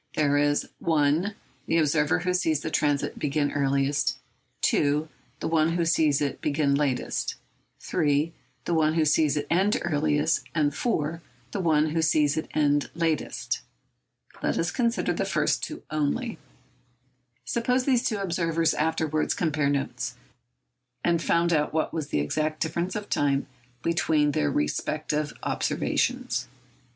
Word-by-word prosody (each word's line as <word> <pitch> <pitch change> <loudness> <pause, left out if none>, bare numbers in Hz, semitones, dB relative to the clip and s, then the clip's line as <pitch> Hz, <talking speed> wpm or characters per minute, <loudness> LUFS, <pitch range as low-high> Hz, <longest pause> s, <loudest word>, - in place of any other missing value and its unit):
There 145 -2 +2
is 145 0 +2
(1) 160 +5 +1 0.3
the 165 - +2
observer 150 -1 +2
who 180 0 0
sees 160 -5 +1
the 160 - -4
transit 145 -2 0
begin 145 0 0
earliest, 140 0 +1 0.5
(2) 150 +2 +2 0.3
the - - -1
one 160 0 +2
who 170 -1 +1
sees 155 -3 +3
it 140 -2 -2
begin 145 -1 +1
latest, 140 -3 -1 0.5
(3) 155 -1 +1 0.3
the 175 - 0
one 155 -1 +2
who 160 -2 +3
sees 150 0 +3
it 145 - -1
end 190 +5 +3
earliest, 150 -1 +1
and 150 -2 +2
(4) 165 -6 -1 0.3
the 205 - -3
one 155 -3 +3
who 165 +1 0
sees 150 -2 +3
it 155 - -2
end 145 -1 +2
latest. 165 -2 -1 0.8
Let - - 0
us 170 - 0
consider 235 -2 0
the - - -1
first - - 0
two 310 - -5
only. 155 - -1 1.1
Suppose 250 +2 0
these 255 -3 +3
two 220 - 0
observers 165 -4 +1
afterwards 155 -1 0
compared 150 -4 +1
notes, 130 -2 -3 0.9
and 170 -1 +2
found 170 0 +2
out 150 -1 +1
what 160 - 0
was 155 -3 -3
the 75 - 0
exact 155 - -1
difference 170 +3 -2
of 210 -1 -4
time 140 -1 +1 0.4
between 160 -3 +2
their 75 - +1
respective 150 - -1
observations. - - -1
155 Hz, 140 wpm, -26 LUFS, 145-170 Hz, 1.1 s, sees